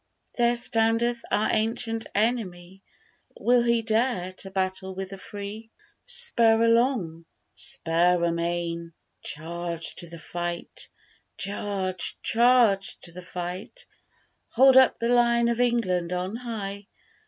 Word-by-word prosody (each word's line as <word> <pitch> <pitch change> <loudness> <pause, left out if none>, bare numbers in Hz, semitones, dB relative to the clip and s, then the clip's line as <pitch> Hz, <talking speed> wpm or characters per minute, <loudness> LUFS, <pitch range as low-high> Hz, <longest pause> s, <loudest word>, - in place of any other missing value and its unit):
There 240 0 +2
standeth 230 0 +1
our 215 - +1
ancient 225 0 0
enemy; 195 -5 -1 0.6
Will 245 0 +4
he 235 -1 +1
dare 220 -5 0
to 195 - -3
battle 190 0 -2
with 190 0 -6
the 195 - -7
free? 205 +3 -8 0.3
Spur 230 - +4
along! 230 -9 +1 0.3
spur 170 +1 +1
amain! 170 0 -2 0.3
charge 170 +2 -5
to 170 - -7
the 170 - -9
fight: 175 - -5 0.5
Charge! 195 -2 -2
charge 230 -4 +4
to 170 - -6
the 180 +2 -9
fight! 180 - -6 0.7
Hold 265 +2 +6
up 260 -1 +6
the 235 - -1
Lion 235 -1 +3
of 235 0 -1
England 185 -8 +1
on 180 +4 -3
high! 205 -5 -6
200 Hz, 120 wpm, -26 LUFS, 175-235 Hz, 0.7 s, Hold